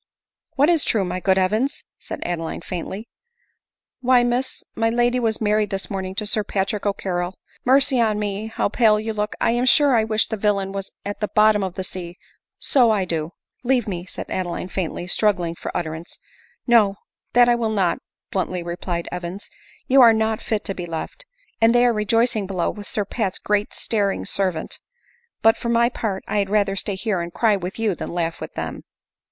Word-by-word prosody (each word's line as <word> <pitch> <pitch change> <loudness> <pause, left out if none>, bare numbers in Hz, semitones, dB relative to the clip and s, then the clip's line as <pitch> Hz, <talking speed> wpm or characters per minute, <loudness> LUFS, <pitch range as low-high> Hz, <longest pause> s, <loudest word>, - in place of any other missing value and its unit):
" - - -69
What 280 +2 +4
is 335 -4 +3
true, 200 -5 +1
ray 180 +1 -3
good 190 +1 +2
Evans 215 +9 +1
?" - - -62
said - - -6
Adeline 165 -2 -3
faintly. 190 +6 -5 0.5
" - - -64
Why, 250 -1 +5
Miss, 245 +2 -1
my 225 0 +1
lady 240 +2 +2
was 225 -2 0
married 210 -1 +1
this 195 0 -4
morning 190 -1 -4
to 210 - -2
Sir 210 +1 +1
Patrick 200 +1 -1
O'Carrol! 185 -2 -2 0.2
— - - -32
Mercy 265 -1 +5
on 215 -2 +2
me, 205 +1 -3
how 225 - -1
pale 215 0 +3
you 220 +1 -3
look! 210 0 -2
I - - +2
am 240 +2 +1
sure 290 +2 +6
1 220 -2 +3
wish 220 0 +2
the 220 - -4
villain 200 -2 0
was 195 0 -5 0.2
at 205 0 -4
the 210 - -1
bottom 210 -1 +4
of 190 -1 -4
the 190 - -3
sea, 180 -1 -6 0.4
so 250 -4 +4
I 205 -4 +2
do;" 165 -1 -3
" - - -51
Leave 245 -3 +2
me," 175 -3 -4
said - - -6
Adeline 180 0 -3
faintly, 175 -1 -3
struggling 180 -3 +1
for - - -7
utter 160 -2 -3
ance. 165 +2 -9 0.3
" - - -35
No 205 -4 +5 0.2
— - - -57
that 245 0 +6
I 240 - +5
will 235 -2 0
not," 195 -5 +1 0.3
bluntly 185 -2 -2
replied 170 0 -4
Evans, 180 +2 -6 0.2
" - - -28
you 265 +1 +6
are 230 -2 +8
not 220 0 0
fit 215 -2 -2
to 195 - -2
be 175 -2 -6
left; 165 - -6 0.3
and 225 +1 +5
they 240 0 +5
are 240 - +4
rejoicing 220 0 +1
below 185 -3 -1
with 205 -1 -10
Sir 210 - -1
Pat's 200 -2 -2
great 210 0 0
staring 200 -3 0
servant. 185 -5 -1 0.6
But, 225 0 +6
for 235 - -4
my 235 0 +4
part, 210 -5 -3
1 - - -1
had 200 -1 0
rather 200 -1 +2
stay 195 +1 -1
here 190 -2 -1
and 170 0 -5
cry 220 +3 +2
with 185 -1 -5
you 225 -3 +1
than - - -6
laugh 170 -1 -2
with - - -7
them." - - -5
210 Hz, 215 wpm, -22 LUFS, 185-225 Hz, 0.6 s, are